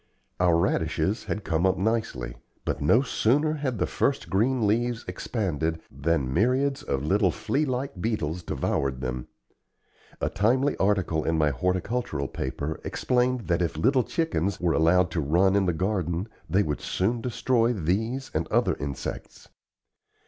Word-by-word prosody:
Our 90 -2 +4
radishes 85 +2 0
had 105 - -3
come 80 -1 0
up 95 - +1
nicely; 95 - -1 0.3
but - - -2
no 115 - +4
sooner 145 +5 +2
had 140 -6 -2
the - - +1
first - - -1
green 115 +4 +2
leaves 115 +3 0
expanded 80 - -2
than 70 -2 0
myriads 130 - +2
of 70 0 -2
little 95 +5 +3
flea 140 - -1
like 130 -7 -3
beetles 90 -7 -1
devoured 70 -5 -1
them. 65 -1 -4 0.9
A - - 0
timely 125 +8 +2
article 95 -5 +1
in 80 - 0
my 75 -2 +3
horticultural 90 - -1
paper 70 +4 -4
explained 125 0 +1
that 85 -3 0
if 85 -3 -1
little 130 - +3
chickens 100 - -1
were 85 -2 +1
allowed 90 +3 +3
to 80 - -1
run 90 +7 +3
in 100 -2 +2
the - - +3
garden 90 0 -1 0.2
they 95 +5 +3
would 75 -5 -3
soon 115 +6 0
destroy 120 0 +1
these 110 +7 -1
and - - -1
other - - +2
insects. 70 -1 -6
95 Hz, 150 wpm, -26 LUFS, 80-120 Hz, 0.9 s, Our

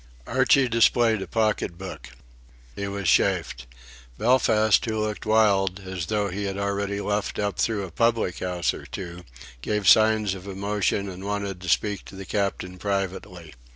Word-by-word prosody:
Archie 135 -2 +3
displayed 115 -2 +3
a - - -5
pocket 110 -6 0
book. 95 0 -8 0.7
He 100 - -4
was 100 -2 -4
chaffed. - - +1 0.5
Belfast, 110 - +3
who 110 -1 -2
looked 105 0 -3
wild, 100 -3 +3
as 95 -3 -5
though 105 -2 0
he 100 +3 -4
had 100 0 -3
already 100 0 -2
luffed 105 0 -2
up 105 -1 -2
through 110 -3 0
a 90 - -10
public 115 -2 +1
house 90 -1 -1
or - - -9
two, 90 -2 -7 0.4
gave 105 - -1
signs 110 -1 +5
of 95 0 -9
emotion 100 0 -1
and 95 0 -8
wanted 100 -2 -3
to 90 - -5
speak 105 +2 +1
to - - -11
the 95 0 -8
Captain 95 -2 -2
privately. 95 -4 -4
100 Hz, 160 wpm, -25 LUFS, 95-105 Hz, 0.7 s, signs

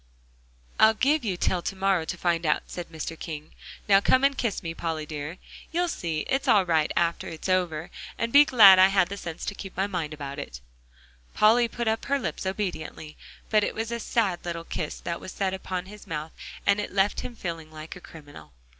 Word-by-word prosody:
"I'll 220 0 +6
give 285 +6 +2
you 195 -5 -2
till 180 0 0
to 195 - -4
morrow 190 -3 +1
to - - -4
find 170 -1 0
out," 150 -2 +1
said 175 -1 -7
Mr. 160 0 -5
King. 155 -2 -7 0.4
"Now 195 -1 +6
come 260 +5 +3
and 275 0 +4
kiss 230 -5 -2
me, 165 -1 -4
Polly 165 -2 -3
dear. 150 +3 -6 0.3
You'll 350 +2 +1
see 165 - -2
it's 270 - -1
all 200 -3 +5
right 160 -3 +2
after 170 -1 0
it's 160 +1 -6
over, 175 -3 0 0.3
and 230 0 -2
be 285 +1 +9
glad 205 -9 +8
I 185 - +8
had 190 -2 +2
the 200 - -4
sense 170 -4 -6
to - - -3
keep 195 -2 -9
my 190 - +2
mind 175 -6 -3
about 145 -1 -6
it." 65 - -7 0.8
Polly 230 +3 +5
put 235 +1 -4
up 220 0 0
her 280 0 +1
lips 250 - -4
obediently. 180 -5 -4 0.4
But 215 -1 +4
it - - -2
was 225 +1 -3
a 235 - -2
sad 210 -6 0
little 170 -1 -4
kiss 160 -2 -4
that 170 0 -4
was 185 - -8
set 190 -1 -1
upon 185 -1 -4
his 210 +2 -12
mouth, 155 0 -4 0.3
and 200 0 +3
it 205 - -4
left 195 +1 +1
him 245 - -6
feeling 165 -6 -6
like 155 +1 -9
a 180 - -11
criminal. 145 - -13
185 Hz, 215 wpm, -26 LUFS, 160-210 Hz, 0.8 s, be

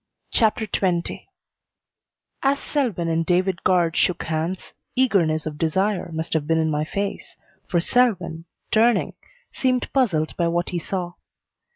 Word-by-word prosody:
CHAPTER 220 -1 +2
XX 180 -4 -1 1.1
As 275 +1 +2
Selwyn 235 - -1
and 165 0 +1
David 180 +1 +1
Guard 175 -3 +3
shook 180 -1 +1
hands, 165 +3 -3 0.2
eagerness 175 -12 +2
of 150 -1 -5
desire 185 +2 0
must 160 +1 -3
have 155 -2 0
been 165 0 +2
in 160 -1 +1
my 150 0 0
face, 200 +4 -4 0.3
for 175 - +1
Selwyn, 175 -6 +1 0.3
turning, 230 +2 +3 0.4
seemed 255 -1 0
puzzled 185 - +1
by 170 - +2
what 170 +1 0
he 175 - -2
saw. 175 0 -4
175 Hz, 140 wpm, -23 LUFS, 165-210 Hz, 1.1 s, Guard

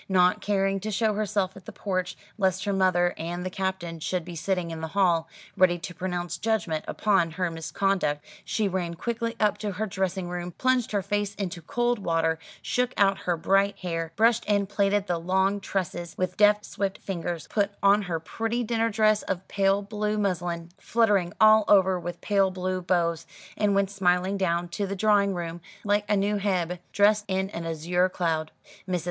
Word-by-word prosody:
Not 180 -1 +3
caring 195 -1 +1
to 210 +3 -4
show 215 +1 +1
herself 200 -2 -1
at 190 -2 -13
the - - -8
porch, 185 -3 -3 0.2
lest 190 -2 +1
her 200 - 0
mother 180 -2 +2
and 175 +2 -4
the 185 - -3
Captain 185 -3 -3
should 175 +2 -2
be 175 -1 -7
sitting 180 0 -1
in 160 -1 -6
the 160 - -3
hall, 170 -4 +3 0.3
ready 180 -1 +4
to 165 +1 -7
pronounce 175 0 -3
judgment 190 -8 0
upon 195 -5 +2
her 175 +1 -2
misconduct, 165 -2 -1 0.2
she 215 -2 0
ran 175 -3 -2
quickly 230 +4 -3
up 210 -1 +2
to 210 -2 -3
her 210 +4 -2
dressing 190 -2 -2
room, 175 0 -5
plunged 255 +1 +1
her 200 -2 0
face 205 +1 -1
into 180 -4 -4
cold 240 +7 0
water, 165 -3 0 0.2
shook 250 0 0
out 195 -1 +3
her 175 -1 -1
bright 195 +3 +2
hair, 165 -3 -3
brushed 230 +1 +3
and 200 -1 +2
plaited 200 0 +1
the 175 -3 -1
long 190 +3 +1
tresses 175 -3 -3
with 185 -1 -1
deft 210 0 +4
swift 195 -1 -3
fingers, 175 -3 -4
put 200 -2 +2
on 200 +1 +5
her 175 -5 -3
pretty 225 +8 -2
dinner 230 0 0
dress 215 -1 +3
of 190 -1 -4
pale 195 0 +2
blue 210 +1 -2
muslin, 175 -4 -2
fluttering 205 -6 +2
all 215 0 +7
over 190 -2 +5
with 175 0 -6
pale 195 -2 +2
blue 185 0 -3
bows, 170 -2 0 0.3
and 205 -2 +1
went 200 -1 +1
smiling 185 0 +1
down 175 -3 0
to 200 +3 -3
the 200 - -3
drawing 200 -1 +3
room 170 0 -5 0.2
like 205 0 +1
a 210 - +3
new 205 +1 +1
Hebe, 180 -3 -1
dressed 210 +1 +3
in 190 0 -1
an 165 -3 -5
azure 175 +3 +1
cloud. 160 -4 -1 0.4
Mrs. 180 -1 +1
190 Hz, 190 wpm, -26 LUFS, 175-205 Hz, 0.4 s, all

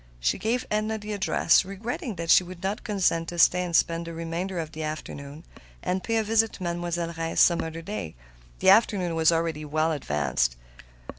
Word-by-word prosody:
She - - 0
gave 240 +3 -1
Edna 215 +1 0
the 210 0 -6
address, 190 -4 +3
regretting 210 +4 -5
that 170 0 -1
she - - +7
would 180 0 -10
not 200 +3 -2
consent 185 -6 0
to 175 - -7
stay 180 +2 +5
and 175 -2 -2
spend 165 0 +2
the 165 - -6
remainder 170 +3 -4
of 160 -2 -4
the 160 - -7
afternoon, 155 -1 -6 0.4
and 185 +1 -1
pay 225 -1 0
a 220 - +2
visit 225 +1 +2
to 185 - -8
Mademoiselle 170 -1 -2
Reisz 165 0 -3
some 170 -1 +5
other 165 +1 -6
day. 165 - -5 0.5
The - - +7
afternoon 195 -5 +3
was 160 0 +4
already 165 -2 -1
well 155 +2 0
advanced. 70 - 0
170 Hz, 195 wpm, -26 LUFS, 160-195 Hz, 0.5 s, she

